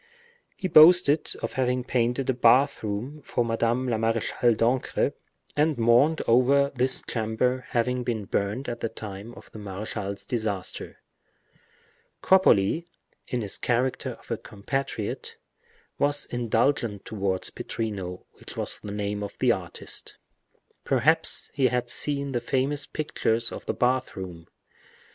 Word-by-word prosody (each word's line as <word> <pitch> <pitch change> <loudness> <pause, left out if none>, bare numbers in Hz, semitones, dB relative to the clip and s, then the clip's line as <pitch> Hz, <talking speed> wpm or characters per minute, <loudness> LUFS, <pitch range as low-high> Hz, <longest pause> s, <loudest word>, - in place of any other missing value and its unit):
He 185 - -3
boasted 160 -2 +6
of - - -3
having 125 -1 0
painted 125 +1 0
a 130 - +2
bath 130 +4 +4
room 115 +8 -4
for 120 -3 -1
Madame 115 +2 0
la 115 -3 0
Marechale 115 +1 +1
d'Ancre, 120 +3 +1 0.4
and 150 0 +2
mourned 120 +7 +4
over 135 +4 +4
this 130 0 0
chamber 125 +3 -1
having 125 +1 0
been 110 -4 -2
burnt 105 +8 -2
at 120 -1 -4
the 115 - -2
time 105 +1 -8
of - - -14
the 110 - -9
marechal's 100 0 -5
disaster. 110 -7 -3 1.2
Cropoli, 170 - +4 0.4
in 125 - -2
his 100 -3 -4
character 125 +2 0
of - - -15
a - - 0
compatriot, 110 +1 -4 0.6
was 145 0 +1
indulgent 115 -2 0
towards 95 -3 -1
Pittrino, 100 -5 -5
which - - -10
was - - 0
the 105 - -7
name 105 0 -3
of 100 - -6
the - - +3
artist. - - -4 0.7
Perhaps - - +2
he 135 -2 +3
had 125 -1 -1
seen 140 -1 +1
the 120 -2 -1
famous 135 +4 -1
pictures 115 -6 -1
of - - -8
the - - 0
bath 125 +1 0
room. 90 -4 -8
120 Hz, 135 wpm, -26 LUFS, 105-130 Hz, 1.2 s, boasted